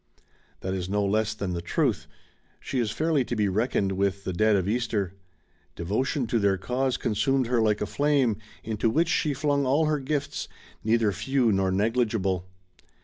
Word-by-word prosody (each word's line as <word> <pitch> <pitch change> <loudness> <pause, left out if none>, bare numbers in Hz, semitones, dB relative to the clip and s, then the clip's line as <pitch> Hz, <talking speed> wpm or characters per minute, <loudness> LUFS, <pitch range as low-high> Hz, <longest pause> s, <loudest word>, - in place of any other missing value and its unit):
That 95 - -2
is 95 -1 -3
no 100 0 +1
less 105 +1 +1
than 100 -4 -3
the 85 - -3
truth. 90 - 0 0.5
She 130 - -3
is 115 -3 +1
fairly 155 +3 +1
to 120 - -3
be 105 -2 +1
reckoned 100 0 0
with 100 0 -1
the 95 - -3
dead 110 +4 +3
of 95 -1 0
Easter. 105 -4 -1 0.6
Devotion 120 - -1
to 115 +1 0
their 100 -2 +2
cause 125 +6 -1
consumed 130 +5 +1
her 120 0 +1
like 105 -1 +2
a - - +1
flame 140 -2 +1 0.3
into 110 0 0
which 165 +8 +2
she 150 -4 +1
flung 145 0 +1
all 140 +4 +2
her 150 -1 +1
gifts, 145 +1 -3 0.4
neither 110 -1 +2
few 125 +4 +1
nor 95 -1 +1
negUgible. 105 -3 0
110 Hz, 175 wpm, -26 LUFS, 100-130 Hz, 0.6 s, dead